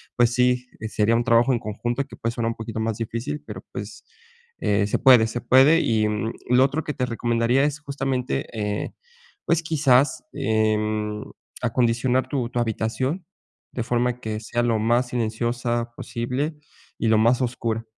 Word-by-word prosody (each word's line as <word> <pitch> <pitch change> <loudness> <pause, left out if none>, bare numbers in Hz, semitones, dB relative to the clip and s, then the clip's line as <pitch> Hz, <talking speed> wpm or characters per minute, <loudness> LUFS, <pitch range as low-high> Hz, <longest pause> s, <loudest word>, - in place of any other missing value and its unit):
pues 120 -1 +3
sí, 125 0 +2 0.2
sería 110 +1 +2
un 120 - +2
trabajo 120 +1 +4
en 120 - 0
conjunto 120 +5 -3
que 135 - -12
puede 115 0 -2
sonar 115 -1 -1
un 115 - -3
poquito 110 0 -6
más 110 -1 -1
difícil, 115 +6 -4
pero, - - -8
pues, - - -7 0.6
eh, 100 0 +1
se - - 0
puede, 125 -4 +7
se 115 +2 -4
puede. 135 +7 +5
Y 110 -1 +2 0.4
lo 125 +1 +5
otro 145 +3 0
que 150 - -3
te 125 - 0
recomendaría 120 +2 +1
es 150 +1 0
justamente, 135 - -2
eh, 105 0 -2 0.5
pues 170 -1 +2
quizás, 140 -4 +3
em, 110 -1 0 0.4
acondicionar 125 +1 +1
tu 130 -5 -1
tu 120 - -2
habitación 120 - -1 0.5
de 120 - -2
forma 125 +1 0
que 110 -2 -3
sea 120 +2 -1
lo 115 -2 +1
más 120 +3 +2
silenciosa 120 0 -1
posible 130 +8 -3 0.4
y 115 - 0
lo 110 - +5
más 120 +3 +3
oscura. 115 -2 -2
120 Hz, 165 wpm, -24 LUFS, 110-130 Hz, 0.6 s, puede